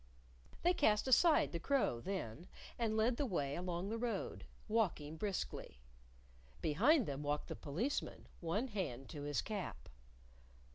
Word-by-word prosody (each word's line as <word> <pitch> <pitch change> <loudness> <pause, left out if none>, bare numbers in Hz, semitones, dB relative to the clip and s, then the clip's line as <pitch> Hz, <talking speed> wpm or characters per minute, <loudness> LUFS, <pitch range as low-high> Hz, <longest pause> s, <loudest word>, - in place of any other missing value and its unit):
They 350 +1 +5
cast 215 -9 +3
aside 305 +5 +5
the 170 - -2
crow, 265 - +1
then, 175 - -4 0.3
and 220 -2 +1
led 235 +2 +3
the 285 - +1
way 145 - -1
along 180 +1 -2
the 225 +1 -2
road, 230 -5 -2 0.2
walking 180 -9 0
briskly. 190 - -3 0.8
Behind 240 - +4
them 140 0 -3
walked 145 0 -1
the - - -3
Policeman, 210 - -2
one 205 +10 -1
hand 135 - -3
to 145 - -6
his 145 0 -1
cap. 205 -4 -5
195 Hz, 140 wpm, -38 LUFS, 150-230 Hz, 0.8 s, They